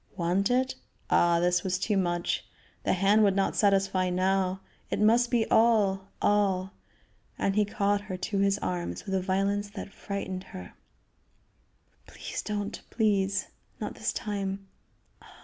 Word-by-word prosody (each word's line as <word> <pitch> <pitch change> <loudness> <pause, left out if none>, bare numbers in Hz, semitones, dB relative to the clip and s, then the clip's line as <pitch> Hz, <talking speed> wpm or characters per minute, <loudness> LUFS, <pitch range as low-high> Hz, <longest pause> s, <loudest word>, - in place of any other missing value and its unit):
Want 180 +3 +1
it? 255 +1 +1 0.4
Ah! 170 0 +4
this 175 0 +2
was 185 -1 0
too 205 +3 0
much! 175 -2 0 0.4
The - - +1
hand 195 +3 +4
would 200 -2 +4
not 195 -1 +1
satisfy 195 -2 +2
now; 185 +1 +1 0.3
it - - -1
must 235 +3 +4
be 235 -3 +2
all, 205 -4 +3 0.2
all! 195 -2 +2 0.6
And 195 - 0
he 210 0 +3
caught 205 0 0
her 200 -3 -6
to 195 +2 -2
his 200 0 +3
arms 175 -1 -3
with 195 - -4
a 190 - +1
violence 200 +2 0
that 205 -1 -8
frightened 190 -2 -5
her. 90 -1 -10 1.3
"Please - - -6
don't, 205 -1 -4
please! 200 -4 +1 0.3
Not - - -4
this - - -2
time. 195 -2 -4
195 Hz, 145 wpm, -28 LUFS, 185-205 Hz, 1.3 s, Ah